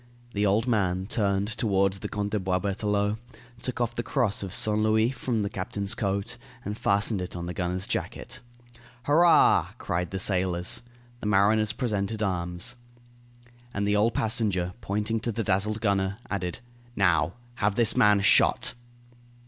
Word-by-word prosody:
The 105 0 +1
old 105 +4 +2
man 95 -5 +1
turned 100 -3 0
toward 100 -3 +1
the 95 - -6
Count 105 -1 -3
de 105 - 0
Boisberthelot, 100 +3 0 0.4
took 125 -1 -4
off 120 -1 0
the 120 - -2
cross 120 -4 0
of 95 -2 -5
Saint 105 +3 +1
Louis 110 +2 +3
from 120 -4 -2
the - - -1
captain's 100 0 -2
coat 100 +2 -2 0.3
and 105 - -3
fastened 100 -1 +1
it 90 - -6
on 85 0 -4
the 90 - -4
gunner's 90 +1 -2
jacket. 125 +4 -4 0.6
"Hurrah!" 165 +5 +5
cried 90 0 -2
the 95 - -4
sailors. 95 +3 +1 0.4
The 105 - -4
mariners 105 +1 +3
presented 110 -2 -2
arms. 90 +4 -2 1.0
And 100 0 0
the 105 - +2
old 110 +3 +2
passenger, 105 -6 +1
pointing 105 +3 -1
to 115 +1 -2
the 115 +1 -2
dazzled 105 +3 0
gunner, 100 -2 0
added: 90 -2 -3 0.3
"Now, 85 -3 +2 0.2
have 105 -1 +1
this 115 -1 +4
man 105 -1 +5
shot." 100 - +4
100 Hz, 155 wpm, -27 LUFS, 95-110 Hz, 1.0 s, Hurrah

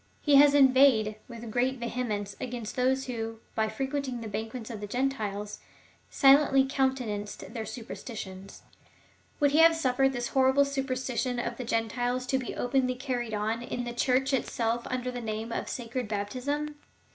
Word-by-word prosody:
He 290 -2 +6
has 285 0 +7
inveighed 260 -6 +5
with 235 -2 -8
great 255 +3 +1
vehemence 230 -4 -3
against 240 -3 -5
those 265 +1 +1
who, 225 -2 -4
by 220 -1 0
frequenting 265 +2 -3
the 225 - -5
banquets 220 +3 -5
of 215 -3 -7
the 205 - -4
Gentiles, 210 -4 -2 0.5
silently 275 0 +5
counte 265 -1 0
nanced 205 -1 -6
their 225 -3 -4
superstitions. 195 -5 -8 0.8
Would 285 -1 +4
he 300 - +3
have 330 0 +8
suiFered 270 -4 +2
this 240 -1 -3
horrible 265 +1 +4
superstition 260 -2 -2
of 240 - -3
the 255 - -4
Gentiles 245 +2 -1
to 265 +1 +1
be 255 - -5
openly 255 0 +1
carried 245 -4 -3
on 220 +2 -1
in 245 0 -4
the 240 0 -5
Church 260 +3 +1
itself 235 -2 -1
under 255 0 -2
the 245 -1 -5
name 220 +1 -4
of - - -3
sacred 245 0 -4
baptism 260 +9 -3
245 Hz, 160 wpm, -28 LUFS, 225-265 Hz, 0.8 s, have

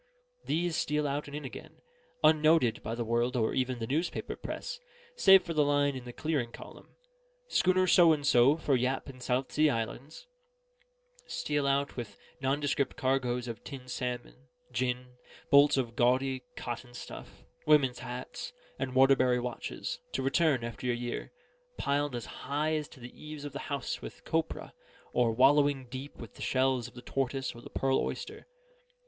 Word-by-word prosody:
These 170 +1 0
steal 150 0 0
out 145 +1 -2
and 145 - -7
in 150 - -7
again, 130 - -9 0.5
unnoted 155 -5 +4
by 115 +2 -4
the 120 0 -3
world 120 +3 +1
or 110 -3 +1
even 130 -1 0
the 115 - -3
newspaper 155 +9 -2
press, 485 -1 -6 0.4
save 195 - +7
for 170 - -4
the 150 -2 +4
line 145 -1 +2
in 130 -1 -7
the 120 - -6
clearing 140 -4 -2
column, - - -12 0.5
"Schooner 185 - +3
So 175 -2 +7
and 150 -2 0
so 130 +3 +5
for 145 -4 +1
Yap 130 +2 0
and 130 -2 -11
South 125 +1 -1
Sea 155 0 +4
Islands" 120 - -4 1.0
steal 145 -2 -1
out 140 0 0
with 110 -5 -6 0.2
nondescript 140 0 0
cargoes 125 -2 0
of 115 -2 -6
tinned 130 -3 -8
salmon, 125 +1 -5 0.2
gin, 125 +1 -2 0.3
bolts 140 0 +7
of 120 -3 -1
gaudy 130 +2 +2
cotton 120 0 -6
stuff, - - -10 0.2
women's 140 -5 +4
hats, 125 - -6 0.3
and 130 -1 -3
Waterbury 130 -2 +5
watches, 120 -1 -4
to 135 - -1
return, 135 -2 +2
after 120 +2 -4
a 120 - +2
year, 120 0 -4 0.5
piled 145 -1 0
as 120 - -4
high 150 +3 -2
as 155 -1 -1
to - - -16
the 120 0 -10
eaves 150 -1 -8
of 145 - -6
the 140 - -4
house 140 -3 -3
with - - -9
copra, - - -2 0.4
or 120 -2 +3
wallowing 135 +2 +4
deep 135 +2 -7
with 115 - -10
the - - -11
shells 130 -2 +1
of 125 - -16
the 125 - -10
tortoise 135 -1 -2
or 120 - -11
the - - -11
pearl 135 0 +1
oyster. - - -5
130 Hz, 170 wpm, -30 LUFS, 125-145 Hz, 1.0 s, save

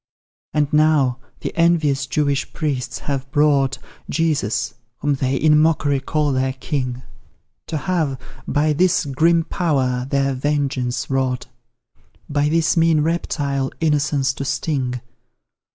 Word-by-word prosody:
And 150 -1 0
now, 150 -5 +3 0.2
the - - -4
envious 155 -5 +2
Jewish 140 +1 0
priests 130 -6 -2
have 135 -2 -4
brought 140 -2 +3 0.3
Jesus 135 -6 0 0.2
whom 145 -1 0
they 135 -1 0
in 150 +2 +4
mock'ry 145 -3 +2
call 150 0 0
their 130 0 0
king 130 -2 -3 0.6
To 160 - -2
have, 150 -4 -1 0.3
by 150 +1 +2
this 180 +2 +2
grim 165 +5 +3
power, 130 -9 0
their 140 -1 +1
vengeance 130 -3 -1
wrought; 130 -2 0 0.8
By 145 0 +1
this 165 +2 +2
mean 165 -2 +4
reptile, 140 -4 -1
innocence 145 -3 +1
to 140 - -5
sting. 130 -4 -2
145 Hz, 120 wpm, -21 LUFS, 130-155 Hz, 0.8 s, in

